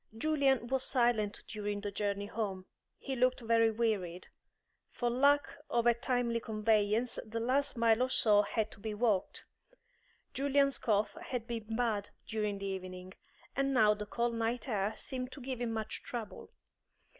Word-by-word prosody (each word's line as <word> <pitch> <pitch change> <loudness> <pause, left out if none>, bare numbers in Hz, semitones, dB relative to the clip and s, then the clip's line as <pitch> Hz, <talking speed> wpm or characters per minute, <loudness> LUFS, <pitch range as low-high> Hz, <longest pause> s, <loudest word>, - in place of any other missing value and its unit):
Julian 275 -2 +2
was 265 +2 0
silent 235 -5 +1
during 205 -1 -3
the 205 -1 -3
journey 200 0 -2
home; 200 -3 -3 0.3
he 270 - -4
looked 255 0 +2
very 230 0 +4
wearied. 210 -6 -1 0.6
For 240 -1 -1
lack 285 +3 +4 0.2
of 235 -1 +1
a 240 - +6
timely 235 -1 0
conveyance 215 +1 +1
the 225 +1 -4
last 260 +3 +1
mile 230 0 +4
or 255 - +2
so 210 -5 +5
had 215 +1 -1
to - - -12
be 215 +1 -4
walked. 210 -4 0 0.9
Julian's 275 -1 +2
cough 210 -2 +1
had 250 -8 -3
been 225 -2 -4
bad 220 -4 0 0.2
during 210 -2 -2
the 195 - -6
evening, 185 -1 -6 0.4
and 275 0 +1
now 210 -3 +6
the 210 0 -6
cold 235 +2 0
night 230 +3 -1
air 210 -2 0
seemed 255 -1 -4
to - - -9
give 255 -1 -5
him 235 -1 -1
much 220 -1 -3
trouble. 230 -4 -7
230 Hz, 160 wpm, -33 LUFS, 210-245 Hz, 0.9 s, a